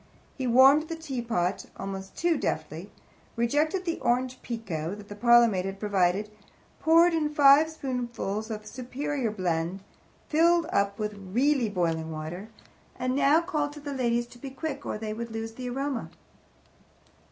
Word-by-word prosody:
He 260 -2 -3
warmed 270 +6 +6
the 330 - -3
teapot 235 - -2
almost 195 0 -6
too 340 0 +2
deftly - - -3 0.5
rejected 300 +10 +1
the 335 -1 -2
Orange 250 +1 0
Pekoe 195 -8 -4
that 205 -1 -12
the 205 - -7
parlour 235 +2 +6
maid 190 -4 -1
had 195 0 -5
provided, 200 0 +1 0.5
poured 335 +2 +5
in 310 -2 +1
five 295 +1 +6
spoonfuls 240 -7 -4
of 215 -1 -5
a - - -21
superior 260 +2 -3
blend, 180 -2 -2 0.4
filled 335 +2 +4
up 200 0 +1
with 210 -1 -3
really 235 +6 +1
boiling 165 -4 -1
water, 160 +7 -6 0.5
and 255 0 -1
now 285 +4 +4
called 300 -4 -2
to 300 - -10
the 285 -1 -6
ladies 240 -2 0
to 240 0 -16
be 275 - -7
quick 285 +1 -5
or - - -2
they 215 0 -4
would 230 +1 -5
lose 225 0 -5
the 250 +1 -6
aroma. 270 -1 -3
240 Hz, 160 wpm, -27 LUFS, 205-285 Hz, 0.5 s, warmed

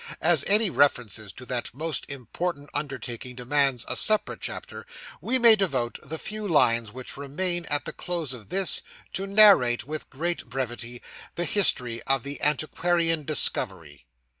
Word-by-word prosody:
As 160 -4 +4
any 210 -1 +4
references 110 -9 +1
to 125 - -11
that 125 -2 -4
most 155 0 -3
important 145 +3 -5
undertaking 125 -4 -5
demands 130 0 +1
a - - -1
separate 215 -1 +1
chapter, - - -7 0.3
we 260 - 0
may 235 -3 +7
devote 135 - -2
the 160 +3 -6
few 215 +4 -5
lines 115 - +2
which 130 +2 -8
remain 175 +5 +1
at 145 -2 0
the - - -6
close 170 -7 -4
of 110 -5 -11
this, 185 -5 +3 0.3
to 195 +1 -3
narrate, 195 - +5
with 155 +2 -6
great 170 +5 -2
brevity, 120 -1 -4 0.3
the 175 - -1
history 125 - +3
of 135 -2 +2
the 140 +1 -5
antiquarian 165 +2 +1
discovery. 85 - -1
145 Hz, 150 wpm, -25 LUFS, 125-175 Hz, 0.3 s, may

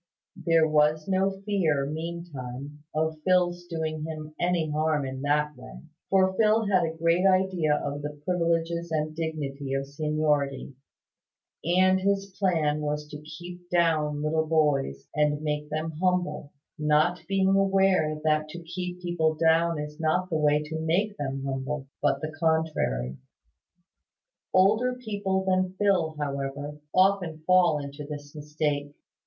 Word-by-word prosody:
There 165 -1 +5
was 155 0 +2
no 190 0 +2
fear, 195 -8 0
meantime, 150 -3 -6
of 155 0 -1
Phil's 175 -1 +2
doing 160 -2 -3
him 155 -1 -6
any 175 -3 +1
harm 155 -1 +1
in 130 0 -5
that 150 +1 +1
way; - - -11 0.3
for 190 -1 +3
Phil 220 0 +4
had 190 -3 +3
a 160 0 -3
great 165 +2 +2
idea 185 -5 +2
of 145 0 -3
the 150 0 -6
privileges 170 -1 0
and 155 0 -1
dignity 145 -4 -3
of 135 0 -1
seniority; 145 -1 -1 0.9
and 185 +3 +4
his 195 0 0
plan 160 -6 +2
was 150 0 -2
to 150 0 -8
keep 175 +3 -10
down 155 -4 +1
little 160 +1 +1
boys, 145 - +1
and 150 0 +1
make 150 0 -2
them 155 +2 -2
humble; 180 -6 0 0.3
not 150 +3 +2
being 195 0 +2
aware 190 -5 +3
that 155 0 +1
to 170 +2 -8
keep 180 +1 -5
people 160 -3 +1
down 165 +1 +3
is 150 +1 -6
not 180 +3 0
the - - 0
way 150 0 +3
to 160 +1 -5
make 185 +7 0
them 135 -1 -3
humble, 135 +1 -3 0.2
but 140 -1 +1
the 155 0 -4
contrary. 155 - 0 1.3
Older 215 +7 +3
people 200 -5 -2
than 185 0 +1
Phil, 185 -6 +2
however, 140 +1 -4
often 185 -4 +2
fall 180 -3 +5
into 140 0 -6
this 145 0 -8
mistake. 150 -1 -2
160 Hz, 140 wpm, -27 LUFS, 150-180 Hz, 1.3 s, There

